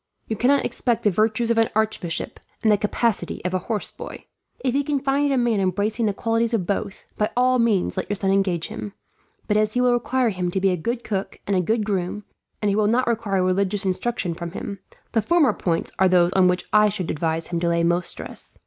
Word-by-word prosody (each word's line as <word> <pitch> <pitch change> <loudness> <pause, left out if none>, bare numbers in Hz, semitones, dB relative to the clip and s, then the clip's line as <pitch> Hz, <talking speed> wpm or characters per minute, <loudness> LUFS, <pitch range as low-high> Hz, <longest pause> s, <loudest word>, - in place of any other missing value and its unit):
You 220 - -2
cannot 270 +6 +3
expect 240 -3 -1
the 210 - +4
virtues 220 +4 +1
of 230 - +3
an 225 - +3
archbishop, 215 -6 -1 0.2
and 220 - +4
the 210 - +5
capacity 210 -3 -1
of 180 - -1
a 185 - +1
horse 210 +3 -3
boy. - - -9 0.4
If 255 -2 0
he 280 - +2
can 285 0 0
find 280 +1 +1
a 270 - +2
man 240 -4 +2
embracing 205 +5 0
the - - +2
qualities 230 +1 0
of 190 -6 -1
both, 200 +1 -3
by 210 - +2
all 255 0 +3
means 215 -5 +1
let 185 - -3
your 205 - 0
son 195 -1 +1
engage 190 -4 +1
him; 205 - -6 0.5
but 210 - +2
as 215 0 +1
he 250 - +1
will 250 -1 +4
require 245 0 +1
him 180 -3 -2
to 190 - -1
be 190 0 +3
a - - +1
good 235 +8 -3
cook, 195 -2 -3
and 200 - 0
a 185 - +3
good 215 +4 0
groom, 195 0 -2 0.4
and 205 - +3
he 200 - +1
will 210 -1 +2
not 245 +4 +2
require 215 -5 0
religious 195 +2 0
instruction 190 -1 -1
from 170 0 -7
him, 200 -2 -6 0.3
the 225 - +2
former 300 -2 +3
points 170 -4 -2
are 190 0 +5
those 180 0 +4
on 185 -1 +5
which 180 0 0
I 210 0 +6
should 190 -5 -3
advise 160 +1 -1
him 170 -1 -1
to 170 0 0
lay 170 0 +1
most 175 +1 +1
stress. - - -8
210 Hz, 235 wpm, -23 LUFS, 185-230 Hz, 0.5 s, I